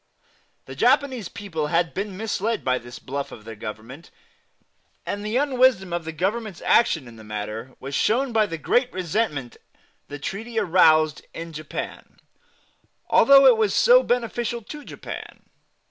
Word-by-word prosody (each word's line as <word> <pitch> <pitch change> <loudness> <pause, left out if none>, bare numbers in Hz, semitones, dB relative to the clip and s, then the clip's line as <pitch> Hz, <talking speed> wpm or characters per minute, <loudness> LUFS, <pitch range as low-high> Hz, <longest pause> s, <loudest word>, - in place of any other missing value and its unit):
The 130 - -9
Japanese 250 - +1
people 180 -7 -4
had 170 +1 +1
been 195 -1 -4
misled 220 +1 -2
by 130 0 +1
this 120 +1 -11
bluff 140 +1 -5
of 105 - -12
their 115 0 -8
Government; 110 +7 -9 1.0
and 205 0 -4
the 215 +3 -1
unwisdom 255 -9 +2
of 175 -2 -3
the 160 - -4
Government's 195 +4 -2
action 165 - +3
in 115 -1 -13
the 110 - -12
matter 105 +4 -6
was 135 +1 -7
shown 245 - +1
by 215 -1 +3
the 165 -3 -5
great 245 - +1
resentment 170 - -2 0.5
the 145 - -7
treaty 220 +10 -6
aroused 160 -6 +4
in 165 0 -7
Japan, 155 -1 -7 0.9
although 275 0 +7
it 250 -4 +7
was 215 -3 +1
so - - +6
beneficial 240 - -2
to 295 +7 -9
Japan. - - -9
185 Hz, 150 wpm, -24 LUFS, 145-230 Hz, 1.0 s, although